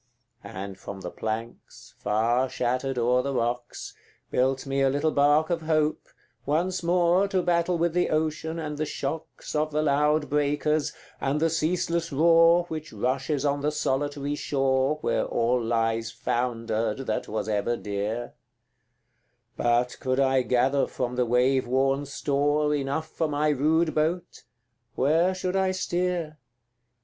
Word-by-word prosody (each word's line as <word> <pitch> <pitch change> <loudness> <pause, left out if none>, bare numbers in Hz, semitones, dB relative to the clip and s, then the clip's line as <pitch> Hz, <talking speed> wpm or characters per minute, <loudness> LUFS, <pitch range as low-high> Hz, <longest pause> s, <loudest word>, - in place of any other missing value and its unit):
And 100 -1 -7
from 95 0 -8
the 90 - -6
planks, 110 - -6
far 115 +5 +1
shattered 130 +2 -1
o'er 125 +1 +3
the 140 +1 -3
rocks, 120 0 -3 0.4
Built 130 +2 +1
me 135 0 -1
a 135 - +4
little 145 +3 +1
bark 145 +3 +3
of 170 -1 0
hope, 155 -1 +1 0.4
once 175 +7 0
more 175 +2 +3
To 190 -2 0
battle 175 0 +1
with 170 0 0
the 180 0 +1
ocean 160 +1 -1
and 150 -2 -5
the 155 - 0
shocks 160 +3 -5
Of 155 0 +1
the 155 0 0
loud 150 +1 +2
breakers, 150 +1 0 0.3
and 140 +2 0
the 165 +1 +2
ceaseless 170 +1 0
roar 165 +3 +5
Which 155 -2 -7
rushes 130 +6 -1
on 140 0 0
the 150 +1 0
solitary 145 0 -1
shore 135 0 +1
Where - - +1
all 120 +1 +1
lies 115 -1 0
foundered 115 0 -2
that 110 - -2
was 105 -1 -3
ever 110 +3 0
dear: 105 +4 -4 1.2
But 120 +1 +1
could 130 0 -1
I 135 -1 +3
gather 130 +3 +2
from 125 -1 -3
the 125 -1 +1
wave 125 +2 +2
worn 135 +2 +1
store 145 +2 0
Enough 145 +2 -2
for 160 0 -2
my 150 +1 0
rude 155 +3 +2
boat, 165 +3 -2 0.5
where 165 +7 +2
should 185 0 -2
I 190 -1 +2
steer? 175 -4 -2
145 Hz, 145 wpm, -26 LUFS, 125-160 Hz, 1.2 s, roar